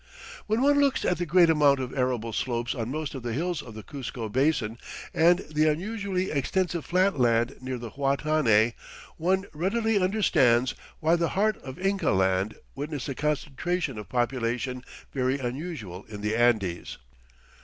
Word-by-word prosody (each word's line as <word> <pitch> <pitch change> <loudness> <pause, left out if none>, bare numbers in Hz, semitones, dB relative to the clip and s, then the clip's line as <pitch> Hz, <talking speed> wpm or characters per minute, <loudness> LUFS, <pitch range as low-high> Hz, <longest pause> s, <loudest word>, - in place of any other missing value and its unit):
When 220 +4 +1
one 285 +1 +4
looks 280 -2 +2
at 180 - +1
the 175 - -2
great 175 +2 +6
amount 145 -3 +4
of 130 -1 -4
arable 125 -4 -1
slopes 120 0 -1
on 115 -3 -4
most 150 +1 -3
of 135 - -6
the 120 -1 -3
hills 170 +5 -1
of 115 - -11
the 110 - -8
Cuzco 125 -5 -6
Basin 125 -2 +1 0.3
and 175 +3 +4
the 155 0 +3
unusually 190 +2 -2
extensive 170 +4 0
flat 185 -3 +2
land 120 +1 +2
near 130 0 -4
the 115 -2 -7
Huatanay, 135 -5 +2 0.4
one 190 +4 +1
readily 205 +6 +1
understands 145 - +3 0.3
why 160 +1 +4
the 170 -1 0
heart 215 +1 +2
of 130 -1 -9
Inca 195 +1 0
Land 95 +2 +1 0.2
witnessed 145 -1 -4
a - - -1
concentration 150 0 -2
of 105 - -9
population 125 0 -1 0.3
very 130 0 +1
unusual 125 - -5
in 105 -2 -9
the 105 +1 0
Andes. 110 -7 +1
140 Hz, 160 wpm, -27 LUFS, 120-175 Hz, 0.4 s, great